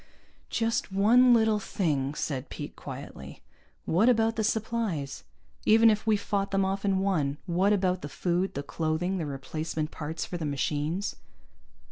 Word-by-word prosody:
"Just 230 -3 -1
one 230 +6 +5
little 220 -2 +4
thing," 150 -8 -1
said 135 -3 -3
Pete 145 - -7
quietly. 130 - -9 0.4
"What 205 +9 +3
about 225 -1 +3
the 220 - 0
supplies? 210 -10 -2 0.4
Even 225 +1 +6
if 215 +1 -2
we 215 -1 +4
fought 200 0 -1
them 195 -1 +1
off 195 +1 -2
and 195 -2 +2
won, 155 -8 0
what 185 +3 +2
about 185 -3 +1
the 145 - -6
food, 180 +4 -1
the 140 - -3
clothing, 165 +5 -1
the 160 - -2
replacement 155 +3 -4
parts 160 +1 -4
for 175 - -5
the 170 - -5
machines?" 150 +6 -2
185 Hz, 155 wpm, -28 LUFS, 150-210 Hz, 0.4 s, Even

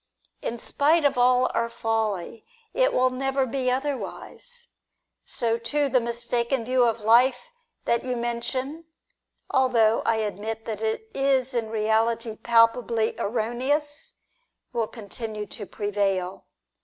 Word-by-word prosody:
In 235 - -3
spite 295 +6 +2
of 285 - +3
all 250 +1 +4
our 230 0 0
folly, 220 -3 -2 0.3
it - - +3
will 255 0 +2
never 270 +1 0
be 255 0 -1
otherwise. 295 - -4 0.6
So, 230 -1 -1
too, 280 +5 0
the 255 - +4
mistaken 235 +1 -1
view 255 0 +3
of 230 -1 0
life 245 - +4 0.4
that 235 - +2
you 255 -1 -2
mention, 255 +6 -3 0.7
although 235 -4 +3
I 230 - +2
admit 220 +1 -3
that 215 -2 -4
it 220 - -2
is 270 -1 +1
in 230 -3 -1
reality 225 +1 0
palpably 230 0 +3
erroneous, 255 +7 -1 0.6
will 230 -2 0
continue 215 -1 -6
to 205 0 -9
prevail. 195 -3 -2
235 Hz, 125 wpm, -25 LUFS, 225-260 Hz, 0.7 s, all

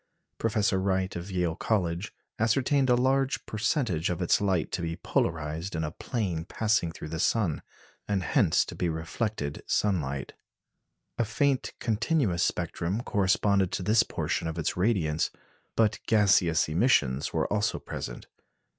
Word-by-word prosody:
Professor 105 -3 +1
Wright 95 0 0
of 85 +3 -5
Yale 90 -3 0
College 90 -2 -1 0.3
ascertained 130 +4 +2
a 125 - +6
large 135 +2 +1
percentage 110 - 0
of 90 - -2
its 90 +1 +2
light 95 -5 0
to 90 - -2
be 85 -1 -2
polarized 80 +2 -2
in 80 - -1
a 75 - -3
plane 90 -6 -3
passing 105 -1 0
through 80 - -8
the 80 +1 -4
sun, 95 -4 +1 0.5
and 100 -2 0
hence 100 - +3
to - - -8
be 90 - -1
reflected 80 0 -3
sunlight. 70 -10 0 0.9
A - - +4
faint 130 +5 0
continuous 115 - +1
spectrum 85 +5 -1
corresponded 100 -2 +2
to 95 - -2
this 110 +5 +4
portion - - -2
of 80 +1 -4
its 80 - -1
radiance; 90 -6 +1 0.5
but 110 -1 +2
gaseous 95 -6 +4
emissions 75 - +2
were - - 0
also 105 0 +1
present. - - -6
95 Hz, 145 wpm, -28 LUFS, 85-110 Hz, 0.9 s, a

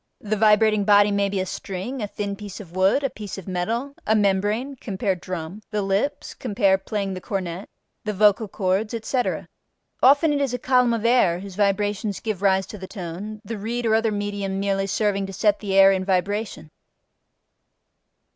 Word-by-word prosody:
The 215 0 -1
vibrating 215 0 +4
body 205 0 +5
may 200 0 +1
be 195 -1 -2
a 185 - -1
string, 195 +7 -5
a 210 - -2
thin 200 0 -4
piece 205 0 -9
of 180 -4 -11
wood, 190 +9 +3
a 275 - +1
piece 210 -2 -7
of 195 - -9
metal, 225 +10 -2
a 220 - +4
membrane 210 +6 +1
(cf. 195 -5 -2
drum), 180 +2 -6
the 210 -2 -1
lips 195 +9 -1
(cf. 200 -5 +1
playing 200 -2 -2
the 185 - -6
cornet), 185 -1 -4 0.3
the 215 - -2
vocal 210 +1 +3
cords, 195 +3 -1
etc. 245 +3 -2 0.5
Often 290 +4 +5
it 285 - 0
is 265 -3 0
a - - -1
column 250 -2 +3
of 225 0 -4
air 230 -8 +4
whose 195 -1 -8
vibrations 205 +1 0
give 215 -4 -4
rise 190 -1 +3
to 210 - -10
the 190 - -7
tone, 195 +3 -7
the 225 0 -5
reed 235 +3 -3
or 220 - +2
other 225 0 +2
medium 205 -2 -3
merely 195 0 0
serving 200 -1 0
to 195 - -8
set 210 +1 +2
the 195 -2 -2
air 195 0 +8
in 190 -1 0
vibration. 195 -2 -2
205 Hz, 185 wpm, -23 LUFS, 195-220 Hz, 0.5 s, air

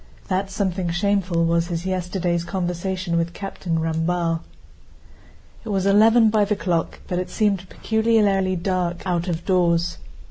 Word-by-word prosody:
That 190 +1 0
something 190 -3 -1
shameful 180 -2 +1
was 170 0 +1
his 170 0 -4
yesterday's 180 -2 -1
conversation 180 0 -2
with 170 +1 -2
Captain 185 -4 -3
Ramballe. 165 +1 0 1.2
It 225 - -7
was 195 -2 0
eleven 220 +3 +5
by 215 -1 +3
the 210 +1 0
clock, 170 -5 -2
but 180 - -1
it 180 0 -4
seemed 195 -2 0
peculiarly 210 -4 +1
dark 180 -1 -2
out 175 -1 -1
of 170 -1 -3
doors. 175 -2 +1
180 Hz, 140 wpm, -22 LUFS, 170-195 Hz, 1.2 s, eleven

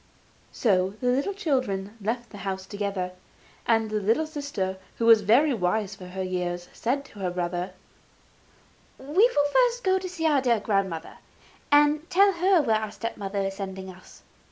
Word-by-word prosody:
So 190 -3 +1
the 255 +8 +1
children 225 - -1
left 235 +4 -3
the 205 - -10
house 190 -1 -4
together; 200 -3 -3 0.6
and 225 -2 +2
the 215 - 0
little 225 +10 +2
sister, 285 - -4 0.2
who 230 - 0
was 225 -2 +7
very 255 +9 +4
wise 205 0 0
for 190 -2 -10
her 190 +1 -4
years, 180 -1 -3
said 275 +4 -1
to 210 - -14
the 185 -2 -1
brother: 175 +1 -3 1.2
'We 265 - -14
will 345 -8 +4 0.2
first 485 +1 -8
go 375 0 +3
and 380 - -5
see 345 -3 -4
our 305 -2 +4
own - - +2
dear 240 -4 +2
grandmother, 195 -6 -2 0.5
and 295 +2 +4
tell 395 +2 +5
her 365 -2 +3
where 225 -5 +2
our 215 -1 -4
step 230 +2 -5
mother 200 0 -3
is 195 0 -3
sending 190 -1 -6
us. 185 0 -16
215 Hz, 175 wpm, -26 LUFS, 190-285 Hz, 1.2 s, was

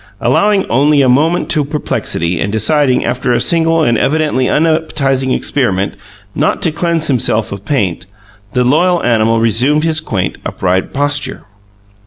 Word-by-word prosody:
Allowing 195 - +2
only 140 +3 +3
a - - +2
moment 155 +8 +2
to 150 -3 +2
perplexity, 115 - -2
and 100 - -1
deciding, 130 +5 +1
after 125 0 -1
a 120 - +1
single 165 -1 +1
and 120 -5 +1
evidently 150 -4 0
unappetizing 150 -4 0
experiment, 100 -11 -1 0.4
not - - 0
to 165 - +2
cleanse 165 0 -1
himself 115 -5 0
of 100 0 -8
paint, 95 - -2 0.5
the 125 - +1
loyal 170 +7 +2
animal 115 -1 +2
resumed 125 +7 +2
his 160 -1 +1
quaint, 95 -11 -3
upright 95 0 -2
posture. 145 -1 -2
135 Hz, 145 wpm, -13 LUFS, 115-155 Hz, 0.5 s, only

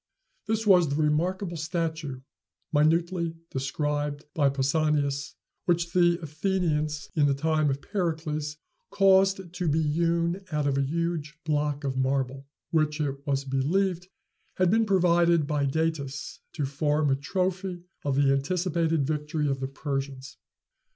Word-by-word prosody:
This 220 0 0
was 180 -6 +5
the 140 - -1
remarkable 170 +4 0
statue 160 -4 -3 0.5
minutely 165 +2 +2 0.2
described 145 +2 -2
by 145 -3 +3
Pausanias 140 +1 0 0.3
which 170 -1 +1
the 175 -1 +4
Athenians, 155 -2 -1
in 145 -3 +4
the 140 - +2
time 155 +1 +1
of 135 +1 -2
Pericles, 155 -6 -2 0.3
caused 190 -2 +3
to 180 -1 -2
be 155 +1 +2
hewn 170 +4 0
out 150 -1 0
of 140 -1 +1
a 140 - +2
huge 160 +1 -2
block 150 -1 0
of 135 -2 -2
marble, 135 0 -1 0.2
which, 155 -1 +1
it 140 -3 0
was 140 -1 0
believed, 175 +7 0 0.5
had 185 -1 +3
been 225 0 +3
provided 170 -4 +4
by 145 -1 0
Datis, 145 -2 -2
to 145 - -1
form 145 +1 +1
a - - +4
trophy 180 +4 -2 0.2
of 140 -2 0
the 140 0 +4
anticipated 165 +1 0
victory 150 0 -1
of 135 -1 -1
the 135 - -2
Persians. 135 -1 -5
155 Hz, 135 wpm, -27 LUFS, 140-170 Hz, 0.5 s, was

